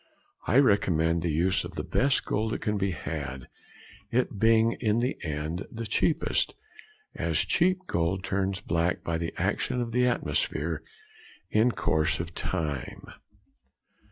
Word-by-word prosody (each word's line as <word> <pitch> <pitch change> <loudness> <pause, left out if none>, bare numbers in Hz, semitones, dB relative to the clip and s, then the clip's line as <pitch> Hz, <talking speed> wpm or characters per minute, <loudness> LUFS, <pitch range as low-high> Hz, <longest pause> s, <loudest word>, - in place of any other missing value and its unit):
I 125 - +4
recommend 85 - +3
the 85 - -1
use 90 +5 +2
of 85 0 -8
the 75 - -3
best 135 - +2
gold 110 +2 -1
that - - -3
can 105 -2 0
be 100 -1 0
had; 65 -6 -5 0.6
it 120 -4 0
being 115 +1 +5
in 110 -2 +1
the 125 +3 0
end 75 +3 -3
the 115 0 -5
cheapest, 130 +9 +1 0.6
as - - -1
cheap 185 +2 +2
gold 90 - 0
turns 95 0 -1
black 85 -1 0
by 80 -1 -1
the 85 0 -2
action 125 - 0
of 120 -1 -2
the 125 +1 +3
atmosphere 80 -5 -1 0.7
in 110 +3 +4
course 80 -1 +1
of 85 0 -5
time. 75 -7 -3
95 Hz, 145 wpm, -28 LUFS, 80-115 Hz, 0.7 s, being